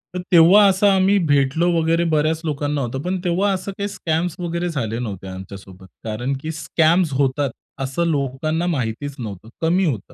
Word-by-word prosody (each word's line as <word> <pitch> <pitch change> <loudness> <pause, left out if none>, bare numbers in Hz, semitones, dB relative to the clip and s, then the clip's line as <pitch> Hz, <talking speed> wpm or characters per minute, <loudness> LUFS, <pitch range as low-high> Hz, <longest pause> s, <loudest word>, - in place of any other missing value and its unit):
तर - - -2
तेव्हा 180 +4 +7
असं 195 +1 +3
आम्ही 195 0 +4
भेटलो 145 +5 +2
वगैरे 165 +1 +1
बऱ्याच 155 +1 +1
लोकांना 145 -1 -1
होतं, 135 +1 -3
पण 180 +3 -2
तेव्हा 185 +3 +1
असं 190 +1 -4
काही 200 - -2
स्कॅम्स 170 -3 -2
वगैरे 175 0 -2
झाले 115 -8 -3
नव्हते 100 -5 -5
आमच्यासोबत, 95 0 -10 0.2
कारण 115 +5 -3
की 155 - -4
स्कॅम्स 165 +1 +1
होतात 135 +1 +1 0.3
असं 135 +6 -1
लोकांना 155 +3 -1
माहितीच 140 -2 -3
नव्हतं, 110 -2 -7
कमी 175 +4 +2
होतं. 120 - -3
155 Hz, 165 wpm, -21 LUFS, 130-175 Hz, 0.3 s, तेव्हा